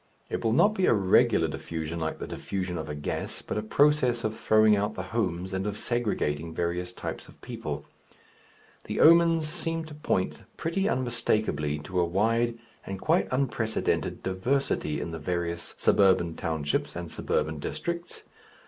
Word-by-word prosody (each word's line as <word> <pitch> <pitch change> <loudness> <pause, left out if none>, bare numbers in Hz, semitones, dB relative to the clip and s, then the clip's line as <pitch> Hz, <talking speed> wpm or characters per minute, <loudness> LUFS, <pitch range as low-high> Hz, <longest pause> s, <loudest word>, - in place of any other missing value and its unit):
It - - -2
will 115 - +2
not 205 - +5
be 190 -3 +1
a - - +5
regular 95 -2 +4
diffusion 80 0 -4
like 80 -1 -2
the - - -5
diffusion 95 -2 -4
of 80 - -5
a 75 - -3
gas, 75 - -4
but - - -4
a 105 - 0
process 125 0 +3
of 110 0 -1
throwing 110 -1 +5
out 105 +2 -1
the - - -4
"homes," 95 -4 -1
and 95 +2 -1
of 105 0 -3
segregating 85 -10 -1
various 90 +1 -1
types - - -6
of - - -17
people. - - -5 1.0
The - - -3
omens 165 -1 +6
seem 165 0 -2
to 155 - -10
point 120 -10 -1 0.2
pretty 195 +5 0
unmistakably 110 - 0
to 90 +4 -2
a 85 - +4
wide 115 +6 +1 0.3
and 95 -1 -6
quite 160 - +2
unprecedented 125 -4 -1
diversity 95 - 0
in 85 - -4
the 80 - -5
various 85 +1 -3
suburban 95 -4 +4
townships 80 -4 -2
and 85 -1 -5
suburban 80 -1 -1
districts. 170 - -4
105 Hz, 160 wpm, -28 LUFS, 85-130 Hz, 1.0 s, omens